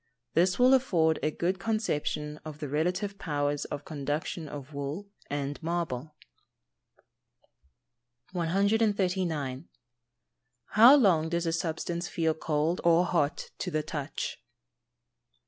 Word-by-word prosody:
This 180 +2 +3
will 255 +1 +6
afford 170 -12 +3
a 155 - +1
good 175 +4 -1
conception 150 -8 -2
of 155 -2 -8
the 150 -1 -5
relative 180 +7 -1
powers 145 -2 -1
of 145 - -6
conduction 150 +2 -3
of 145 0 -8
wool 140 +7 -4 0.2
and 145 0 -3
marble. 160 -4 -3 2.2
139. 180 - 0 1.1
_How 245 +7 +9
long 165 -9 +3
does 170 0 -1
a 165 - 0
substance 170 +1 -2
feel 160 -1 0
cold 155 +2 -1
or 170 +1 +5
hot 150 -5 0
to 180 - -2
the 155 -2 -1
touch? 145 -5 -4
165 Hz, 110 wpm, -29 LUFS, 150-180 Hz, 2.2 s, How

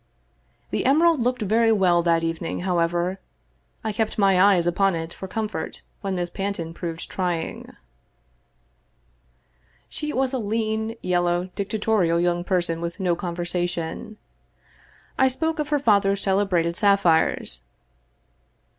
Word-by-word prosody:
The - - -1
emerald 315 +3 +4
looked 250 -1 0
very 225 +3 +3
well 185 -5 +3
that 165 -1 +2
evening, 165 +1 -3
however. 175 +1 0 0.6
I 220 - -1
kept 220 +1 -2
my 195 -3 +4
eyes 190 -3 +5
upon 190 +2 +2
it 165 0 -5
for 190 - -8
comfort 215 -5 -4 0.2
when 195 -1 -2
Miss 175 -1 -3
Panton 195 -5 -4
proved 165 -1 -6
trying. 175 -3 -3 2.1
She 300 -1 -4
was 265 0 0
a 260 - 0
lean, 220 +1 -2
yellow, 175 0 0
dictatorial 200 -4 +1
young 175 0 +1
person 175 -3 -1
with 170 +3 -5
no 180 -3 +1
conversation. 175 +2 -3 1.0
I 265 - +6
spoke 320 +5 -1
of 300 -1 -2
her 295 - +2
father's 200 -6 +2
celebrated 190 -4 +1
sap 200 +1 +3
phires. 160 - +2
190 Hz, 130 wpm, -24 LUFS, 175-220 Hz, 2.1 s, I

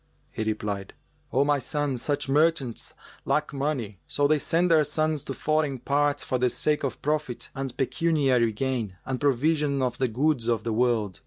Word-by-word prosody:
He - - -5
replied, 105 -2 -3 0.4
"O 135 - +3
my 145 -1 +2
son, 145 +1 -1
such 145 +4 -2
merchants 145 -4 +1 0.3
lack 150 0 0
money; 135 - -2
so 145 - +1
they 155 0 +3
send 170 +4 +1
their 155 -2 +6
sons 155 0 -1
to 135 - -4
foreign 155 0 0
parts 145 +3 +1
for 130 - -1
the 125 0 +3
sake 150 +4 0
of 135 - -3
profit 150 -4 -2
and 135 -2 -5
pecuniary 135 -5 +2
gain 115 -5 -2
and 130 -1 -3
provision 145 0 +2
of 125 -1 -2
the 130 - +2
goods 125 +1 0
of 115 -2 +1
the 115 - -1
world. 110 -6 +1
135 Hz, 175 wpm, -26 LUFS, 120-150 Hz, 0.4 s, their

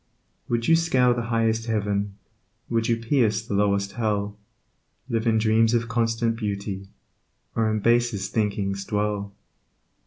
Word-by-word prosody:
Would 120 -1 0
you 165 - +6
scale 130 -7 +3
the 120 - -2
highest 115 0 +1
heaven, 100 -2 -1 0.6
Would 115 -1 +1
you 115 - +2
pierce 115 -3 +1
the 110 - -4
lowest 100 -1 +1
hell, 105 -3 -1 0.7
Live 115 -2 -1
in 110 -1 +3
dreams 110 +1 +3
of 115 0 0
constant 115 0 0
beauty, 100 -3 -4 0.7
Or 110 -1 +2
in 110 -1 -1
basest 115 -4 +1
thinkings 100 -2 -1
dwell. 105 0 -2
110 Hz, 135 wpm, -25 LUFS, 100-115 Hz, 0.7 s, you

